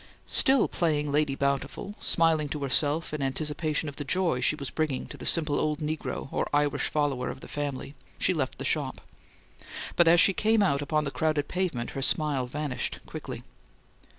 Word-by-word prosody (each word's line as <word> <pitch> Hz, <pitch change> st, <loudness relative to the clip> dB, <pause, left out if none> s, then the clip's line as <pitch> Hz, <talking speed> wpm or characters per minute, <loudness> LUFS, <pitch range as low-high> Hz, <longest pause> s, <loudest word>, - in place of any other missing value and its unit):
Still 270 Hz, -3 st, +5 dB
playing 150 Hz, -4 st, 0 dB
Lady 145 Hz, -1 st, +1 dB
Bountiful, 140 Hz, +8 st, -2 dB
smiling 160 Hz, -3 st, +2 dB
to 145 Hz, 0 st, -4 dB
herself 145 Hz, +4 st, +1 dB
in 150 Hz, -, -3 dB
anticipation 150 Hz, +3 st, -1 dB
of 145 Hz, -, -7 dB
the 145 Hz, -, -3 dB
joy 170 Hz, -4 st, +1 dB
she -, -, +2 dB
was 140 Hz, -4 st, -6 dB
bringing 155 Hz, -5 st, -1 dB
to -, -, -10 dB
the -, -, -4 dB
simple 155 Hz, -3 st, +3 dB
old 150 Hz, -1 st, 0 dB
negro 155 Hz, -2 st, -4 dB
or -, -, -1 dB
Irish 145 Hz, -1 st, +1 dB
follower 145 Hz, -4 st, -1 dB
of -, -, -7 dB
the -, -, -10 dB
family, 145 Hz, -1 st, -4 dB, 0.2 s
she 185 Hz, -, +2 dB
left 145 Hz, -6 st, -2 dB
the -, -, -5 dB
shop; -, -, -1 dB, 0.9 s
but 175 Hz, -, +5 dB
as 170 Hz, +1 st, +6 dB
she 195 Hz, -, +6 dB
came 220 Hz, +2 st, +3 dB
out 140 Hz, -7 st, +1 dB
upon 150 Hz, +1 st, 0 dB
the 140 Hz, -, -3 dB
crowded 155 Hz, -2 st, 0 dB
pavement 175 Hz, -11 st, -2 dB
her 135 Hz, -, -5 dB
smile 140 Hz, -2 st, +2 dB
vanished 145 Hz, 0 st, -3 dB
quickly. -, -, -7 dB
150 Hz, 180 wpm, -27 LUFS, 140-160 Hz, 0.9 s, as